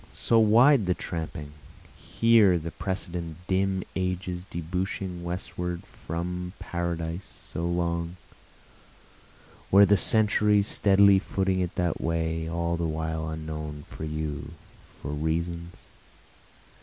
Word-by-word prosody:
so 115 - +3
wide 115 +1 +5
the 90 - +2
tramping? 80 -3 -5 0.7
Were 110 -6 +6
the 85 0 -5
precedent 85 -4 -4
dim 95 0 +1
ages 90 -1 -2
debouching 90 +1 -3
westward 90 0 -4
from 90 +2 -5
Paradise 85 0 -3 0.3
so 85 +1 -1
long? 85 0 -1 1.5
Were 100 +1 +8
the 100 +1 +4
centuries 105 +1 +4
steadily 100 -1 +5
footing 95 -1 -1
it 90 -2 -2
that 90 -2 -1
way, 80 0 -1
all 85 0 -1
the 85 -1 -1
while 80 0 -3
unknown, 75 -1 -6
for - - -7
you, 75 -2 -4 0.5
for 70 - -4
reasons? 85 +3 -3
85 Hz, 110 wpm, -27 LUFS, 80-95 Hz, 1.5 s, Were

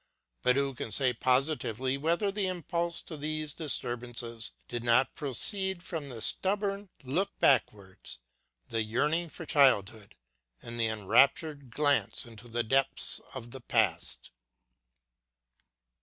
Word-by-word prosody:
But 125 - +3
who 140 0 +1
can 120 -3 -6
say 130 0 +2
positively 130 0 +1
whether 170 +8 0
the 200 -1 -1
impulse 170 -1 -2
to 160 - -8
these 155 0 -3
disturbances 120 -5 -2 0.2
did 120 -1 -5
not 120 +2 +3
proceed 190 - +1
from 155 -6 -5
the 115 -4 -7
stubborn 200 - -1
look 160 +10 -1
backwards, 100 -8 0 0.5
the 115 -1 -1
yearning 150 +10 0
for 165 - -8
childhood, 110 - +2 0.4
and 120 0 -8
the 115 - +2
enraptured 135 - +2
glance 145 +2 +2
into 115 0 -12
the 120 0 -1
depths 135 +4 +3
of 120 -2 -8
the 135 - -8
past - - 0
135 Hz, 125 wpm, -30 LUFS, 120-160 Hz, 0.5 s, But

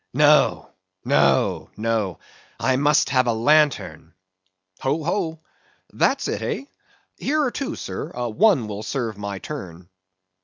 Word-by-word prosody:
No, - - +4 0.4
no, - - +2
no; 110 -5 -1 0.4
I 130 - +2
must 145 +1 +3
have 130 -2 +3
a 120 - +2
lantern. 115 - +1 0.6
Ho, 145 +4 -1
ho! 165 -2 -2 0.5
That's - - +1
it, - - -3
hey? 275 - -4 0.5
Here 300 +2 +1
are 255 - 0
two, 275 +1 -4
sir; - - -5 0.2
one 165 - +3
will 105 0 -5
serve 115 -4 -3
my 100 -1 -4
turn. 90 - -8
130 Hz, 125 wpm, -23 LUFS, 105-155 Hz, 0.6 s, No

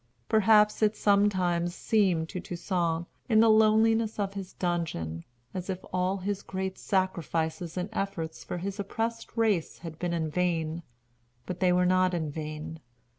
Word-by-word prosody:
Perhaps 215 0 +4
it 215 0 +3
sometimes 185 -4 +2
seemed 185 -7 +2
to 185 - -4
Toussaint, 170 -2 -2 0.2
in 220 -2 +5
the 225 0 +6
loneliness 220 +1 +4
of 200 -2 -1
his 195 -2 -7
dungeon, 160 - -2 0.3
as 185 +1 -5
if 185 -1 -4
all 185 +2 +1
his 195 +1 -3
great 190 -1 -4
sacrifices 170 -3 -1
and 180 +1 -1
efforts 165 -6 -3
for - - -5
his 195 +3 -4
oppressed 230 +4 -3
race 210 -8 +1
had 165 -2 -9
been 175 -1 -1
in 160 -2 -1
vain. 165 -2 0 0.6
But 180 - -5
they 185 -1 +3
were 180 0 +3
not 185 0 +3
in 160 -3 -2
vain. 155 +1 -6
185 Hz, 155 wpm, -28 LUFS, 170-205 Hz, 0.6 s, the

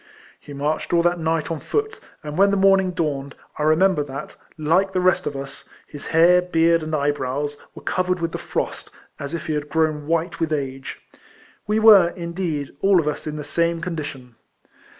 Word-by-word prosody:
He - - -13
marched 145 +4 -2
all 170 -1 +4
that 175 0 +1
niglit 160 0 -1
on 160 - -3
foot; 435 - -2 0.2
and 150 -1 -6
when 200 +3 +5
the 200 - +1
morning 195 -1 +4
dawned, 145 -5 -3 0.2
I - - -2
remember 155 +2 +3
that, 135 -1 -8 0.2
like 175 +6 +1
the 185 - +1
rest 185 0 +2
of 145 - -3
us, 135 0 -8 0.2
his 145 - -10
hair, 175 +2 +5
beard, 165 -1 +2
and 155 0 -3
eye 145 0 +2
brows, 145 +1 -3 0.2
were - - -11
covered 180 0 0
with 165 0 -2
the - - -5
frost, - - -4 0.3
as 140 +3 -4
if 165 - -6
he 155 - -2
had 150 0 -3
grown 155 -2 0
white 165 +2 -1
with 165 -1 -1
age. 135 -3 -4 0.7
AVe 210 - +2
were, 205 -6 +8
indeed, 170 -5 -4
all 195 -2 +5
of 155 - -1
us 150 +1 -3
in 150 - -4
the 150 - -5
same 170 +3 0
condition. 145 -8 -6
165 Hz, 195 wpm, -22 LUFS, 150-180 Hz, 0.7 s, were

